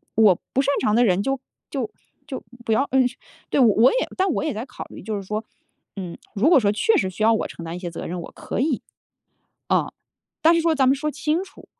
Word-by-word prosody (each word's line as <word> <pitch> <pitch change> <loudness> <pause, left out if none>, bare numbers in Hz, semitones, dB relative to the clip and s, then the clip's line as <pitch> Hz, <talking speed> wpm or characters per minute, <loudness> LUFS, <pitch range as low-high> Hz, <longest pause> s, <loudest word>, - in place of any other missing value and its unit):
我 210 -5 +5
不 270 - +3
擅 280 - +1
长 210 - +2
的 245 - +5
人 190 0 +2
就 270 -1 -1 0.3
就 255 -6 -2 0.4
就 265 -4 -6 0.2
不 225 - +2
要 270 - +3
呃 265 - +4 0.5
对， - - +1
我 230 -1 +6
也 - - 0 0.2
但 380 -1 +2
我 - - -1
也 300 - -1
在 225 +4 -4
考 - - -8
虑 - - -11
就 215 +2 -3
是 200 - -4
说， 210 +3 -3 0.5
嗯， 180 -3 -6 0.2
如 225 +10 +3
果 310 - +7
说 205 -3 +2
确 435 - +2
实 190 - +1
需 215 +4 -4
要 225 +1 +6
我 - - 0
承 170 - -9
担 165 +1 -5
一 - - -6
些 175 -2 -4
责 - - -6
任， 175 0 -4
我 - - -8
可 - - -5
以， 275 -2 0 0.9
哦。 - - +1 0.5
但 330 +2 +6
是 335 - +3
说 325 -1 +2
咱 270 -2 +3
们 265 - +5
说 300 +2 -2
清 310 +5 -1
楚。 385 - -14
230 Hz, 260 characters per minute, -23 LUFS, 200-285 Hz, 0.9 s, 果